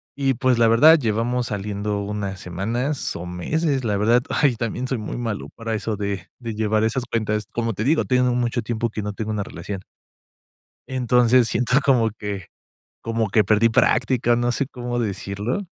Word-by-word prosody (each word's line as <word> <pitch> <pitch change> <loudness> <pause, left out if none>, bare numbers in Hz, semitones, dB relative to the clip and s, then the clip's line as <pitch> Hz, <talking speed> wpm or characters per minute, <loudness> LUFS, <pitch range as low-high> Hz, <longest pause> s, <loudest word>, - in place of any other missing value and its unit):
Y, 135 -1 +1
pues, 125 0 +1
la 115 - +5
verdad, 150 +9 +7
llevamos 120 +1 0
saliendo 105 0 -3
unas 100 -2 -4
semanas 115 - -2
o 85 - -6
meses, 135 - -1
la 105 -2 +1
verdad 115 +4 +3
ay, 140 -5 +2
también 120 +2 -3
soy 130 0 -2
muy 105 +1 -5
malo 115 -4 -3
para 115 -1 -4
eso 110 0 -2
de 100 -2 -4
de 115 -3 -5
llevar 110 0 +1
esas 120 +3 0
cuentas, 110 -2 -1
como 115 -1 -1
te 105 - -3
digo, 155 +6 +2
tiene 125 -1 +2
mucho 120 0 0
tiempo 115 +1 -2
que 110 - -5
no 105 0 -4
tengo 110 +1 -4
una 105 -1 -1
relación. 100 -1 -7 1.1
Entonces, 125 -1 +3
siento 125 +3 +2
como 120 -5 +3
que 100 -3 -6 0.5
como 115 -1 -1
que 110 - +4
perdí 110 +3 +3
práctica, 120 +1 +2
no 120 0 +1
sé 140 - -1
cómo 120 -2 -4
decirlo. 105 - -2
115 Hz, 180 wpm, -22 LUFS, 105-125 Hz, 1.1 s, verdad